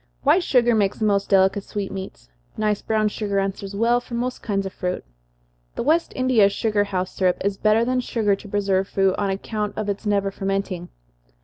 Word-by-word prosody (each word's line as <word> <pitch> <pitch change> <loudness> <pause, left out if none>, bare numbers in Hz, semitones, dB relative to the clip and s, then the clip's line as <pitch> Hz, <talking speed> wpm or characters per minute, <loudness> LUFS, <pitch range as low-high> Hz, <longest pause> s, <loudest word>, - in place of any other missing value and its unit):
White 315 +6 +4
sugar 240 -6 +3
makes 205 -3 +1
the 220 - -1
most 200 -1 +1
delicate 195 0 +3
sweetmeats 195 - -6 0.3
nice 210 -1 0
brown 215 -1 +1
sugar 205 -1 -2
answers 195 0 -2
very 200 - -4
well 240 +1 +4
for 245 -1 -7
most 250 +1 -3
kinds 195 -2 -1
of 190 - -5
fruit. 180 0 -3 0.7
The - - -2
West 320 +5 +2
India 255 -6 +4
sugar 205 0 0
house 185 -2 -2
syrup 185 -2 +1
is 200 -1 +1
better 215 +3 +3
than 255 +1 +1
sugar 220 -5 +1
to 200 +1 -12
preserve 195 -1 +1
fruit, 195 -1 +2
on 200 -1 0
account 210 +2 -3
of 215 -1 -2
its 200 +2 -3
never 200 -1 +1
fermenting. 195 -2 -3
205 Hz, 195 wpm, -23 LUFS, 195-220 Hz, 0.7 s, White